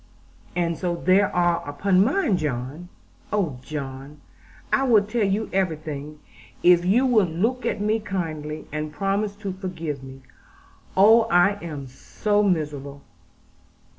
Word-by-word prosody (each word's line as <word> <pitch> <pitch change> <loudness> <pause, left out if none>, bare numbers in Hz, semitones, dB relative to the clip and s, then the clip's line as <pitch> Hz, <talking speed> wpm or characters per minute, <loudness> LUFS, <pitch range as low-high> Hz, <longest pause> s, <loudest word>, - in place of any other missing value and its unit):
'And 170 -2 -1
so 175 -1 -1
there 185 +3 +3
are 175 -1 +2
upon 185 +6 +3
mine, 265 - +1
John. 150 +2 -4 0.4
Oh, 170 -12 -1
John, 140 0 -7 0.5
I - - +4
will 230 -6 +5
tell 215 +2 -1
you 205 +3 0
everything, 155 -5 -2 0.5
if 175 -1 +6
you 215 +9 +3
will 220 -7 +4
look 225 +11 -1
at - - -1
me 215 +2 +1
kindly, 155 -7 -4
and 155 +1 -4
promise 200 +5 -1
to 200 -2 -5
forgive 170 -7 -5
me. 135 0 -11 0.8
Oh, 220 +4 +7
I 200 0 +3
am 150 -5 -6
so 205 - -1
miserable!' 145 -7 -2
175 Hz, 135 wpm, -24 LUFS, 150-205 Hz, 0.8 s, Oh